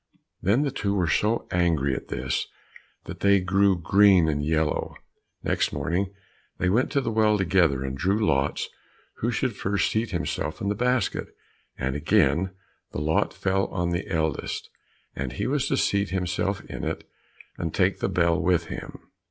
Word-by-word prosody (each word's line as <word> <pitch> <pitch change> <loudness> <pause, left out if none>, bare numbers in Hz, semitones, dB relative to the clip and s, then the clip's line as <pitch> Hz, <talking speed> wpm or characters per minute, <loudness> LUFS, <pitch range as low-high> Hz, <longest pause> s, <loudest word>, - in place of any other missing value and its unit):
Then 105 - +3
the 140 - -1
two 100 -6 -1
were 90 -3 +1
so 105 +8 +1
angry 80 -6 +2
at - - -5
this - - -2 0.6
that - - -8
they 100 0 +4
grew 95 0 +2
green 95 0 +5
and 75 -1 0
yellow. 80 0 0 0.5
Next - - +1
morning 85 +7 -1 0.5
they 90 - +1
went 115 +7 +2
to 140 - +3
the 115 -3 -2
well 110 -1 +3
together, 85 -8 +2
and 65 0 -3
drew 100 +9 +1
lots 70 -5 +1 0.5
who 115 - -1
should 120 -1 -1
first 100 +1 0
seat 110 +2 0
himself 75 - -3
in 100 - -1
the - - +2
basket, 125 0 0 0.5
and 65 +1 -2
again 75 +3 +2 0.4
the - - -4
lot 75 +1 +1
fell 95 +1 0
on 85 -1 -2
the 85 +2 -2
eldest, 80 -3 -2 0.4
and 65 -1 -4
he - - -3
was 140 0 0
to - - +1
seat 100 0 +1
himself 95 +1 -1
in - - -7
it, - - -3 0.5
and 80 - -2
take 95 +2 +1
the - - 0
bell 85 -1 +2
with 85 -1 +1
him. - - -7
90 Hz, 170 wpm, -26 LUFS, 80-100 Hz, 0.6 s, green